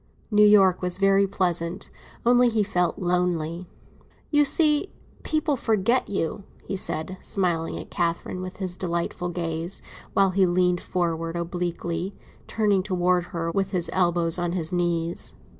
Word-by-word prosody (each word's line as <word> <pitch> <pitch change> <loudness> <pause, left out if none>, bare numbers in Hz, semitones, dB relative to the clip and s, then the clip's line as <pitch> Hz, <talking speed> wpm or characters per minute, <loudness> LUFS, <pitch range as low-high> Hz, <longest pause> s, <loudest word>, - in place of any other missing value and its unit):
New 210 0 +4
York 195 -3 +5
was 180 -1 -2
very 195 0 +3
pleasant, 175 -2 -1 0.3
only 245 0 +5
he 220 -2 +1
felt 180 -3 0
lonely. 175 -1 -1 0.6
"You 295 -1 +5
see, 300 +4 +4 0.3
people 310 -1 0
forget 230 +1 +1
you," 195 0 -2 0.2
he - - -3
said, 185 0 -3
smiling 170 -4 -1
at - - -9
Catherine 170 +1 -2
with 185 0 -7
his 185 -2 -2
delightful 175 0 -2
gaze, 170 +1 -4 0.3
while 195 -1 +3
he 190 0 +3
leaned 180 0 +1
forward 165 -2 -2
obliquely, 175 +1 -3 0.3
turning 205 -3 +1
towards 180 -2 0
her, 165 -1 -3
with 195 +1 -1
his 175 -2 +1
elbows 175 -2 +2
on 175 0 -1
his 170 -2 -2
knees. 170 -1 -1
180 Hz, 140 wpm, -25 LUFS, 170-195 Hz, 0.6 s, York